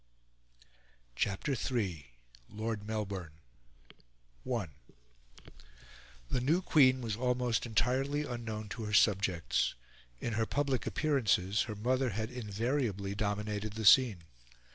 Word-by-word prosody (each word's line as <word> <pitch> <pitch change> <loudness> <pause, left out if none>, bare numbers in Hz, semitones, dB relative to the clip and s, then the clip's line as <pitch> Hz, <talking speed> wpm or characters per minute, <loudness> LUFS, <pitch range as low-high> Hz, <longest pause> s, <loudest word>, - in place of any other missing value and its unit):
CHAPTER 100 - -1
III. 100 - -2 0.4
LORD 110 -1 -4
MELBOURNE 100 -7 -4 1.2
I 115 -7 -1 1.6
The 125 - -1
new 160 +8 +2
queen 130 -6 +5
was 110 -3 -2
almost 125 0 0
entirely 135 +6 +1
unknown 115 -4 -5
to 115 0 -5
her 105 - -4
subjects. 100 -6 +2 0.4
In 115 - -3
her 110 +1 0
public 135 -6 -1
appearances 105 -9 +1
her 105 - -4
mother 130 +4 +1
had 110 +3 -3
invariably 110 -3 -2
dominated 105 0 -2
the 110 0 -4
scene. 110 -6 +6
110 Hz, 105 wpm, -32 LUFS, 105-125 Hz, 1.6 s, scene